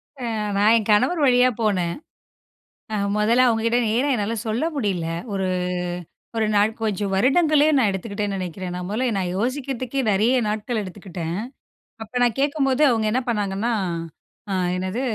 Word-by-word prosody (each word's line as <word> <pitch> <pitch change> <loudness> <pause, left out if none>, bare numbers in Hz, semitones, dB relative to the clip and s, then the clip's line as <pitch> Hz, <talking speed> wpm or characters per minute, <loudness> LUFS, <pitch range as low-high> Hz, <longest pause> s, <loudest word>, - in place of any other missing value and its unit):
அ 265 - -12 0.4
நான் 210 +3 +5
என் 220 -2 -2
கணவர் 255 +11 +3
வழியா 250 -1 +5
போனேன். 185 -6 0 1.0
அ - - 0 0.2
மொதல்ல 230 +4 +4
அவங்ககிட்ட 230 0 +2
நேரா 240 +6 +1
என்னால 215 +1 -1
சொல்ல 225 +7 0
முடியல. 195 - -1 0.3
ஒரு 190 -1 -1 0.9
1 220 -1 +2
நாள் 205 +2 +4
கொஞ்சம் 205 -3 -1
வருடங்களே, 295 - +4
நான் 245 -5 +4
எடுத்துக்கிட்டேன்னு 200 +1 -3
நெனைக்கிறேன். 185 0 -5
நான் 180 0 -5
மொதல்ல 235 +5 0
நான் 180 -2 -1
யோசிக்கிறதுக்கே 255 +2 -2
நெறைய 225 +6 +3
நாட்கள் 215 +2 -2
எடுத்துக்கிட்டேன். 180 -3 -6 0.7
அப்ப 220 - -17
நான் 240 -2 +2
கேட்கும்போது 280 -1 +1
அவங்க 225 -3 +1
என்ன 255 +4 +1
பண்ணாங்கன்னா, 205 +1 -1 0.8
அ - - 0 0.2
என்னது 185 +7 -2
220 Hz, 145 wpm, -23 LUFS, 195-250 Hz, 1.0 s, நான்